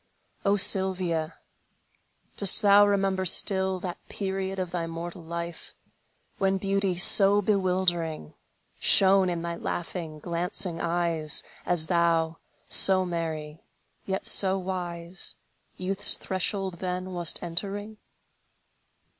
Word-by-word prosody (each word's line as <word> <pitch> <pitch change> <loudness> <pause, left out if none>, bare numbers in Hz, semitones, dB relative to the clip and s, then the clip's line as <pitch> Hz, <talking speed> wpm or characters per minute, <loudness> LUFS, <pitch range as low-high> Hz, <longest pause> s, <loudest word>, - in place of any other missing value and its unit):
O 200 +1 +2
Sylvia, 185 -5 0 1.0
dost 200 +2 +5
thou 205 0 +6
remember 195 -2 0
still 190 +1 +3
That 175 -1 -6
period 195 -1 -4
of 185 -2 -4
thy 170 -2 -3
mortal 170 +2 -7
life, 170 0 -7 0.6
When 195 0 +1
beauty 195 -1 -1
so 195 +2 +5
bewildering 180 - -1 0.5
Shone 190 -1 +5
in 170 -1 -4
thy 170 0 -5
laughing, 170 -3 -5
glancing 170 +2 -2
eyes, 170 -2 0 0.2
As 175 -3 +2
thou, 165 -1 0 0.3
so 190 -1 +5
merry, 160 -3 -5 0.5
yet 190 0 -3
so 190 -1 +3
wise, 180 -1 -5 0.4
Youth's 190 +2 +4
threshold 190 -1 -4
then 185 0 -5
wast 175 -1 +2
entering? 200 +5 -5
180 Hz, 105 wpm, -26 LUFS, 170-195 Hz, 1.0 s, thou